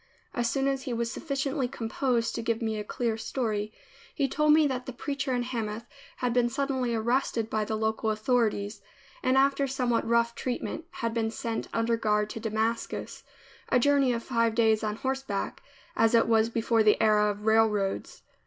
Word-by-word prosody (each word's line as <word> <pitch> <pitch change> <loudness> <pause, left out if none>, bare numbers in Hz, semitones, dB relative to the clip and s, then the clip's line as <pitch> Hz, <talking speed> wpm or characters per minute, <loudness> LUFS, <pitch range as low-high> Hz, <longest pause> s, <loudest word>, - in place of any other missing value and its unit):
As 240 -1 0
soon 270 +3 0
as 270 -1 0
he 260 -3 -4
was 230 0 -1
sufficiently 275 -2 -2
composed 235 -1 -1
to 230 - -3
give 230 0 -1
me 220 -2 -2
a - - -3
clear 225 +1 -2
story, 220 -3 -2 0.4
he 280 -3 +1
told 300 +2 +2
me 310 0 +6
that 255 -3 -2
the 260 - -5
preacher 275 +1 -3
in 245 - 0
Hamath 230 -3 -4 0.3
had 250 -2 -1
been 240 -1 +3
suddenly 260 -2 -1
arrested 230 -1 0
by 215 -1 0
the 220 - -2
local 220 0 0
authorities, 215 -2 0 0.4
and 260 +1 +2
after 275 +1 +3
somewhat 250 -4 0
rough 235 0 +2
treatment, 255 +6 -4
had 230 -10 -3
been 225 -1 0
sent 225 0 -4
under 230 0 +1
guard 210 -1 +1
to - - -6
Damascus, 225 +1 -2 0.5
a - - +4
journey 275 0 +3
of 235 -1 -2
five 230 -3 +1
days 220 -2 +3
on 210 -1 -1
horseback, 265 -5 -3 0.3
as 225 +1 +4
it 230 - +4
was 225 0 +3
before 230 0 +1
the 215 -1 +4
era 210 -1 +4
of 205 +1 -5
railroads. 220 -3 +1
230 Hz, 180 wpm, -28 LUFS, 220-260 Hz, 0.5 s, me